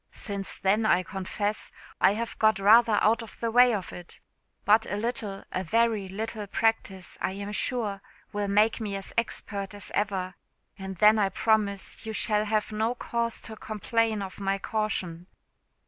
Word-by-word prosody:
Since 200 -2 -5
then, 200 +4 +2
I 185 -4 +3
confess 200 +3 -3 0.3
I 195 - +5
have 230 +2 -5
got 220 0 +4
rather 215 +2 +6
out 225 +3 +3
of 225 - -11
the 230 -1 -1
way 245 +1 +6
of 200 -5 -3
it; 175 -1 -11 0.5
but 215 +2 +4
a - - -2
little, 210 -2 -4
a 185 - -2
very 220 0 +1
little 215 +1 -5
practice, 195 -4 -1
I 190 - -1
am 200 +1 -6
sure, 210 0 +1 0.3
will 205 0 -1
make 210 +3 +2
me 205 -2 -3
as 195 -1 -5
expert 205 -3 -3
as 205 - -7
ever; 190 -3 -1 0.4
and 190 -1 -7
then 215 +3 +5
I 200 -2 +2
promise 200 -1 0
you 220 -1 -5
shall 210 -1 +2
have 215 0 0
no 220 +3 0
cause 235 -1 -2
to 220 - -8
complain 220 0 -1
of 190 0 -8
my 195 0 0
caution." 190 -5 -3
210 Hz, 170 wpm, -27 LUFS, 195-220 Hz, 0.5 s, rather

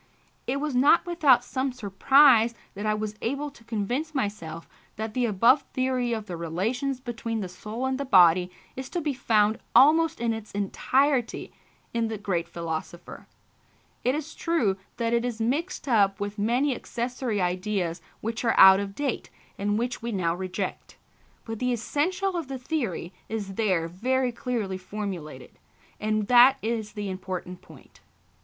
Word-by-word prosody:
It 270 +3 0
was 300 -1 -2
not 285 +7 +5
without 295 -8 +4
some 260 +1 -2
surprise 240 +2 +4 0.2
that 205 +2 -4
I 215 - +2
was 215 0 -3
able 280 +4 -2
to 235 - -19
convince 240 +8 -3
myself 170 - -3 0.3
that 220 0 -5
the 245 0 +1
above 230 +7 +4
theory 255 -2 0
of 220 -2 -2
the 180 - -6
relations 220 - -2
between 230 -3 -4
the 190 - -3
soul 215 +7 -6
and 265 0 -1
the - - -1
body 180 -7 +5 0.3
is 265 0 -6
to 350 - -2
be 295 -2 -1
found 220 -4 +2 0.2
almost 320 +3 +5
in 230 -1 0
its 220 -1 -8
entirety 255 +6 0 0.4
in 230 -1 0
the 220 -1 -4
great 185 -4 -2
philosopher. 170 +1 -6 0.8
It 255 +3 +2
is 310 +1 -5
true 265 - 0 0.2
that 230 -1 0
it 235 0 +2
is 240 -2 -3
mixed 290 +10 -2
up 200 -5 +3
with 205 +1 -4
many 245 +7 +2
accessory 240 -2 -3
ideas 180 -1 -1 0.2
which 230 +2 -3
are 230 - +2
out 190 0 +9
of 200 -1 -5
date 280 -4 -3 0.3
and 205 +1 -1
which 240 +2 -2
we 235 +1 -3
now 175 -5 0
reject; 185 +2 -5 0.5
but 225 -1 -5
the 250 0 0
essential 360 - -1
of 335 -5 -3
the 270 0 -5
theory 245 - -3 0.2
is 205 -3 -4
there 185 -6 +1
very 250 +8 0
clearly 230 -6 -3
formulated, 185 -9 -7 0.4
and 215 0 0
that 250 +4 +7
is 220 -1 -2
the 205 -1 -4
important 185 -1 -6
point. - - -17
225 Hz, 160 wpm, -26 LUFS, 195-260 Hz, 0.8 s, out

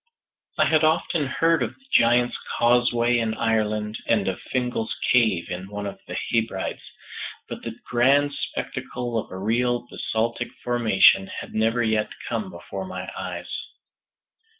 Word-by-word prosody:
I - - +5
had 155 -1 +3
often 155 -1 +2
heard 165 +5 +2
of - - -2
the 270 - -28
Giant's 120 +1 +4 0.2
Causeway 120 0 +3
in 110 -1 -1
Ireland, 110 -1 0
and 105 -4 +2
of 95 -1 -2
Fingal's 125 -3 -1 0.2
Cave 110 -9 +3
in 90 +2 -5
one 105 0 -5
of 100 - -6
the - - -5
Hebrides, 110 -4 -1 0.7
but - - -7
the - - -6
grand 140 +4 +3
spectacle 125 -3 -4
of - - -6
a 95 - -7
real 120 +4 +1
basaltic 115 +1 -2
formation 110 -5 +4
had - - -7
never 115 +2 +2
yet 110 -1 +1 0.2
come 110 -5 -2
before 95 +2 -7
my 95 -1 -6
eyes. 90 -2 -5
115 Hz, 145 wpm, -24 LUFS, 100-120 Hz, 0.7 s, I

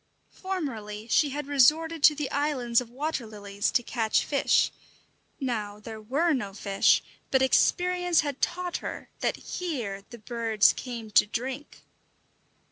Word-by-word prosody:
Formerly 230 - -5
she 290 +5 +3
had 290 +1 -4
resorted 305 +4 +3
to 300 - +7
the 290 -2 -3
islands 260 -5 +1
of 240 - -9
water 275 -1 -3
lilies 205 -1 -3
to 245 - +1
catch 225 -2 0
fish; 280 - +2 0.7
now 215 -6 -3
there 220 0 -9
were 295 +10 +1
no 205 -8 -3
fish, 200 -2 +3 0.3
but 265 -1 +3
experience 355 +5 +3
had 285 -3 -5
taught 355 0 -1
her - - -7
that - - 0
here 240 - -4
the 235 - -10
birds 225 -1 +2
came 235 -4 -7
to 210 - +5
drink. 260 +6 -5
255 Hz, 140 wpm, -27 LUFS, 220-300 Hz, 0.7 s, to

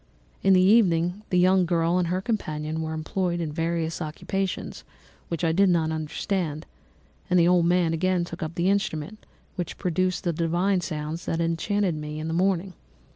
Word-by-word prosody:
In 195 - +4
the 185 - +6
evening 185 -2 +3
the 180 - +1
young 185 0 +4
girl 170 +1 +2
and 175 - 0
her 180 +2 -1
companion 160 -8 -3
were 160 0 -3
employed 175 +3 -2
in 160 -3 -3
various 165 +1 -2
occupations 185 +5 -3 0.4
which 170 0 -4
I 165 - +3
did 195 +3 +4
not 165 -3 +2
understand; 160 0 -3 0.6
and 180 - +3
the 170 - +5
old 175 -1 +4
man 175 -2 +2
again 180 +1 +1
took 170 0 -9
up 160 +1 -4
the 180 +3 +2
instrument 200 0 -2 0.3
which 175 -3 -4
produced 185 +1 -1
the 175 -3 0
divine 175 +4 +1
sounds 155 0 -4
that 165 - -1
had - - +1
enchanted 175 +3 0
me 150 0 -5
in 155 - -4
the 160 - -2
morning. 185 +1 +1
170 Hz, 185 wpm, -25 LUFS, 160-185 Hz, 0.6 s, the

